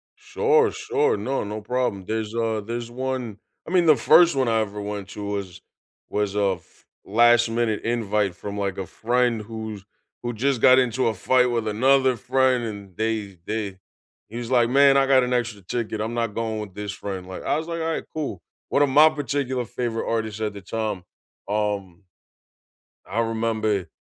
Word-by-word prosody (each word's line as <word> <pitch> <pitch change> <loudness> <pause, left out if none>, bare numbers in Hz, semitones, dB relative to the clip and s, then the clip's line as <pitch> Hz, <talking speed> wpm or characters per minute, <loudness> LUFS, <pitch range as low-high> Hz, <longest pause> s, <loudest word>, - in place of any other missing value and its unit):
Sure, 455 -1 +2
sure. 440 0 0
No, 135 - -2
no 105 +1 -5
problem. 115 -4 -2
There's, 110 0 -3
uh, 115 -2 0
there's 120 +1 -5
1 125 -4 -3 0.3
I - - -6
mean, 180 -3 +3
the 155 - +7
first 160 +6 +5
one 130 -2 +1
I 115 -1 +2
ever 105 -1 -4
went 100 -2 -5
to 105 - -7
was 100 -3 -5 0.5
was 105 -1 -1
a 100 -2 +2
f - - -28 0.2
last 120 +2 +4
minute 115 -2 0
invite 105 -5 0
from, 100 +2 -6
like, 100 -1 -2
a 95 - -3
friend 120 +2 0
who's, 110 -2 -7 0.4
who 120 0 -3
just 125 +2 0
got 130 -1 +7
into 125 -1 +2
a 110 - 0
fight 125 +5 +3
with 115 -2 -1
another 130 +4 +3
friend, 130 +2 +1
and 100 -4 -7
they 110 -4 -2
they 105 -4 -3 0.5
he's 120 +2 -6
like, 120 -2 +4
"Man, 140 +1 +6
I 135 0 +3
got 130 -2 +5
an 125 - -1
extra 115 -4 -1
ticket. 110 +2 -3
I'm 110 +2 -3
not 115 -3 -2
going 110 -1 -2
with 105 -3 -7
this 105 -1 -4
friend." 95 -2 -6
Like, 95 - -7
I - - +1
was 160 +1 -4
like, 170 0 -3
"Alright, 160 0 -2
cool." 155 -2 -4 0.3
One 140 - +2
of 145 - +2
my 150 +4 +7
particular 140 -4 -2
favorite 115 -1 -3
artists 110 -1 -2
at 105 -1 -1
the 100 - -9
time, 105 -1 -3 0.4
um, 100 -3 -2 1.1
I 115 - -1
remember 110 -4 0
115 Hz, 185 wpm, -24 LUFS, 105-130 Hz, 1.1 s, the